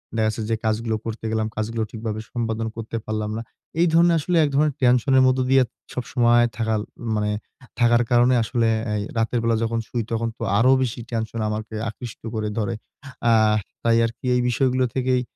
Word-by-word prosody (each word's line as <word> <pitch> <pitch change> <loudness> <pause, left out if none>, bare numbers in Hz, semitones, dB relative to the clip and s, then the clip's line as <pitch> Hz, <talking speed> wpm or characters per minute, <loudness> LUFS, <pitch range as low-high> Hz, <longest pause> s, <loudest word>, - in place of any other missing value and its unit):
দেখা 110 -1 +2
যাচ্ছে 110 +1 -2
যে 115 - +2
কাজগুলো 110 +1 0
করতে 115 0 -5
গেলাম, 110 -1 0
কাজগুলো 110 +1 -2
ঠিকভাবে 110 -1 -4
সম্পাদন 115 -1 -2
করতে 115 0 -5
পারলাম 110 0 -2
না। - - -3 0.4
এই 175 - +5
ধরণের 170 0 +5
আসলে 175 +4 -1
এক 145 - +2
ধরণের 150 -1 +2
টেনশনের 130 +1 +4
মধ্যে 130 0 +2
দিয়ে 135 -1 +6 0.3
সবসময় 120 -1 +3
থাকাল 110 -2 0 0.3
মানে 105 0 0 0.5
থাকার 120 0 +4
কারণে 120 +1 +5
আসলে 115 0 0 0.3
এই 105 - -1 0.2
রাতের 115 +1 +1
বেলা 115 -1 +2
যখন 115 0 -1
শুই, 120 -2 -2
তখন 115 0 0
তো - - -5
আরো 125 +4 +5
বেশি 120 -2 -2
টেনশন 115 0 -3
আমাকে 110 +1 -4
আকৃষ্ট 115 0 -9
করে 105 -1 -1
ধরে। 110 +2 -1 0.6
আ - - +5 0.5
তাই 115 -1 +4
আরকি 115 +3 -6
এই 125 - +2
বিষয়গুলো 130 0 +2
থেকেই 130 -1 +1
115 Hz, 180 wpm, -23 LUFS, 110-125 Hz, 0.6 s, দিয়ে